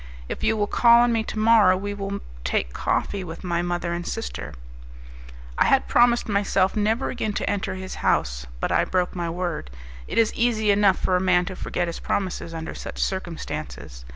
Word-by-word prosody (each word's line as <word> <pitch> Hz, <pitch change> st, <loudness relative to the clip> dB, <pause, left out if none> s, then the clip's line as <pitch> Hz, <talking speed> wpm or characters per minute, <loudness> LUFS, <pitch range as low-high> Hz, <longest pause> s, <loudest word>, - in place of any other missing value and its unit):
If -, -, -5 dB
you 220 Hz, -, +2 dB
will 205 Hz, -, +2 dB
call 235 Hz, +2 st, +5 dB
on 240 Hz, -1 st, +3 dB
me 225 Hz, -1 st, +1 dB
to -, -, -6 dB
morrow, 215 Hz, -4 st, +5 dB
we 205 Hz, +2 st, -4 dB
will 200 Hz, 0 st, -4 dB, 0.2 s
take -, -, -1 dB
coffee 200 Hz, -2 st, -1 dB
with 165 Hz, -2 st, -8 dB
my 175 Hz, -1 st, 0 dB
mother 175 Hz, 0 st, -2 dB
and 175 Hz, 0 st, -3 dB
sister." 65 Hz, -, -5 dB, 1.0 s
I -, -, +5 dB
had 270 Hz, -, +3 dB
promised 240 Hz, 0 st, +4 dB
myself 200 Hz, -2 st, +1 dB
never 220 Hz, +4 st, +1 dB
again 220 Hz, -4 st, -2 dB
to -, -, -2 dB
enter 200 Hz, -1 st, -1 dB
his 185 Hz, 0 st, -6 dB
house, -, -, 0 dB
but -, -, -1 dB
I -, -, +3 dB
broke 180 Hz, -1 st, -1 dB
my 170 Hz, -2 st, -2 dB
word. 170 Hz, -, -3 dB, 0.4 s
It -, -, -5 dB
is 225 Hz, -1 st, +3 dB
easy 220 Hz, -3 st, +2 dB
enough 200 Hz, -2 st, +4 dB
for 185 Hz, -, 0 dB
a 180 Hz, -, +2 dB
man 180 Hz, -1 st, +3 dB
to 185 Hz, 0 st, -6 dB
forget 175 Hz, -, -2 dB
his 170 Hz, -1 st, -5 dB
promises 185 Hz, -3 st, -2 dB
under 160 Hz, -1 st, -6 dB
such -, -, -8 dB
circumstances. 170 Hz, -, -4 dB
190 Hz, 195 wpm, -24 LUFS, 175-215 Hz, 1.0 s, call